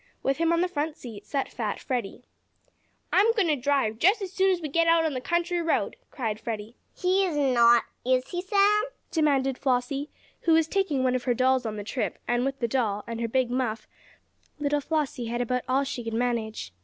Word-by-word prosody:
With 270 0 +1
him 330 0 +2
on 335 0 +2
the 360 - +2
front 310 -2 -3
seat 215 -5 -10
sat 275 -2 -2
fat 215 -3 -3
Freddie. 245 -2 -4 0.9
"I'm 420 +4 +5
going 420 -5 +2
to 300 - +3
drive, 260 -4 0
as 390 0 +3
soon 385 0 +3
as 370 -2 +2
we 315 - -4
get 330 +3 +2
out 330 0 +4
on 310 - 0
the 255 - -3
country 345 +4 0
road!" 330 -1 0
cried 220 -6 -3
Freddie. 225 0 -5 0.2
"He 375 +2 +2
is 345 -6 -1
not; 240 -4 +5 0.2
is 255 0 +1
he, 355 -1 -3
Sam?" 405 +3 +3 0.3
demanded 275 -5 +1
Flossie, 270 +3 0 0.3
who 330 - +2
was 320 -1 +4
taking 320 -9 0
one 255 -1 +2
of 255 -1 -2
her 245 -2 +2
dolls 255 -1 +2
on 215 - -4
the 205 - -5
trip, 225 +4 -3
and 240 0 +1
with 270 0 -2
the 235 - -1
doll, 215 -4 -1
and 230 0 -5
her 230 - 0
big 250 +1 0
muff, 245 -3 -2 0.7
little 290 0 0
Flossie 290 -5 -2
had 240 +1 -2
about 250 +1 0
all 265 +2 +3
she 260 -3 -4
could 225 -1 -4
manage. 225 - -2
265 Hz, 210 wpm, -26 LUFS, 240-330 Hz, 0.9 s, I'm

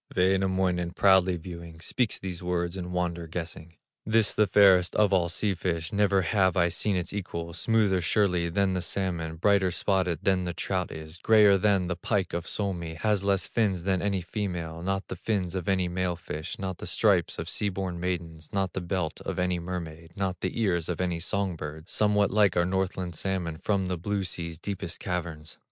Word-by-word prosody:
Wainamoinen, 95 -2 +1
proudly 95 -2 +4
viewing, 85 -1 -9
Speaks 105 +6 0
these 90 -3 -6
words 90 0 -1
in 90 -1 -5
wonder 85 -2 -2
guessing: 85 0 -6 0.3
"This 110 0 +3
the 105 -1 +3
fairest 95 -2 +5
of 105 -2 +3
all 85 -2 +3
sea 100 +3 0
fish, 85 -2 -2
Never 100 -2 +3
have 95 0 +2
I 85 -1 +4
seen 95 +4 0
its 90 +1 -2
equal, 85 -4 -4
Smoother 100 0 +2
surely 90 -1 +1
than 95 +2 +1
the 90 - -1
salmon, 85 -3 -1
Brighter 95 +2 +3
spotted 90 -3 0
than 95 -2 +2
the 90 -1 -4
trout 90 -2 -2
is, 80 +2 -8
Grayer 105 -1 +6
than 95 -1 +2
the 90 0 -2
pike 95 +1 -1
of 85 +1 -3
Suomi, 85 -5 -3
Has 105 +3 +1
less 100 -1 +2
fins 100 -7 0
than 95 -1 +1
any 100 -1 0
female, 85 -4 -4
Not 95 +2 -2
the - - -5
fins 90 -2 -2
of 95 -1 -3
any 95 -2 +2
male 90 0 -1
fish, 80 -2 -6
Not 95 -2 -4
the - - -6
stripes - - +2
of - - -4
sea 105 - 0
born 95 -2 -4
maidens, 85 -3 -4
Not 95 -2 -1
the 95 - -3
belt 85 -2 -2
of - - -4
any 90 -1 0
mermaid, 85 -2 -6
Not 95 -2 -2
the 95 +5 -2
ears 90 -7 +1
of 90 - -2
any 90 -2 -1
song 95 +1 -1
bird, 80 +2 -8
Somewhat 105 -1 +3
like 100 -3 +3
our 85 - +4
Northland 95 -1 -1
salmon 85 -2 -3
From 100 -2 0
the 90 -1 -2
blue 100 +3 -2
sea's 85 -3 -4
deepest 90 -2 -5
caverns." 85 -3 -4
90 Hz, 195 wpm, -27 LUFS, 85-95 Hz, 0.3 s, Grayer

